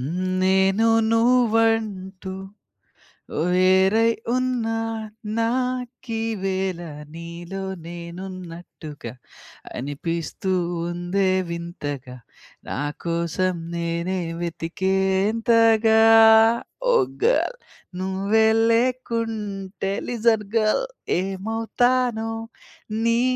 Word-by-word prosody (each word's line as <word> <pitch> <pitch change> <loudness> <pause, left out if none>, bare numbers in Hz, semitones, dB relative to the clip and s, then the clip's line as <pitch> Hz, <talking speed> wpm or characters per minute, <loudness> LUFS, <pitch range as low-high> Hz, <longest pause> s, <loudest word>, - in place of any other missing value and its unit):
హ్మ్ 170 +8 -2 0.2
నేను 190 +4 +3 0.2
నువ్వంటూ 225 -5 +1 1.2
వేరై 190 +5 +4 0.2
ఉన్నా 250 -3 0 0.6
నా 230 0 +2 0.6
కీవేళ 195 -5 -2 0.3
నీలో 170 +3 -7 0.2
నేనున్నట్టుగ 170 -2 -9 0.7
అనిపిస్తూ 165 +7 -3 0.4
ఉందే 175 +3 0 0.2
వింతగ, 170 -5 -5 0.6
నాకోసం 170 +5 -2 0.2
నేనే 170 +2 -2 0.2
వెతికేంతగా 205 +6 +2 0.9
ఓ - - +4 0.3
గర్ల్. - - +2 0.4
నువ్వే 195 +4 +2 0.2
లేకుంటే 225 -5 -1 0.2
లిజన్ 230 -2 +2
గర్ల్, 215 - +2 0.4
ఏమవుతానో 225 +4 0 0.8
నీ 230 +1 +3
195 Hz, 60 wpm, -23 LUFS, 175-225 Hz, 1.2 s, వేరై